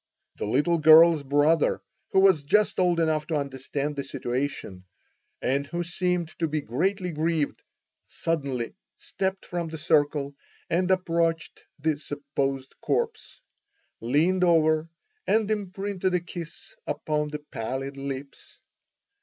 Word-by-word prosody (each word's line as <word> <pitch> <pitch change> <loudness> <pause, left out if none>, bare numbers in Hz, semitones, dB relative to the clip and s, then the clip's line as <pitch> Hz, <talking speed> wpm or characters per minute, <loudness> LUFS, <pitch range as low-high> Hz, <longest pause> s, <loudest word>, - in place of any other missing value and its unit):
The - - -3
little 150 +9 +2
girl's 160 +1 +8
brother, 145 +3 +2 0.3
who 190 - +4
was 190 -6 +5
just 205 +10 +2
old 175 -2 +3
enough 155 -2 +1
to 165 - -1
understand 140 +1 -3
the 140 - -3
situation, 125 -8 -4 0.6
and 140 +2 0
who 170 +2 -3
seemed 180 -1 -1
to 165 - +1
be 155 0 -1
greatly 180 - -1
grieved, 160 -1 -1 0.5
suddenly 140 -7 -2 0.2
stepped 190 0 -3
from 175 -1 -3
the 160 - -6
circle 145 -2 +1 0.4
and 180 +2 +1
approached 165 -3 0 0.2
the 155 0 0
supposed 140 -2 -3
corpse, 460 -2 -2 0.6
leaned 160 +10 +2
over 160 -2 +3 0.4
and 220 -1 +2
imprinted 195 -2 -2
a - - +3
kiss 175 - -9
upon 150 -1 -1
the 150 0 -4 0.2
pallid 135 +4 -3
lips. 140 0 -7
155 Hz, 125 wpm, -26 LUFS, 140-175 Hz, 0.6 s, girl's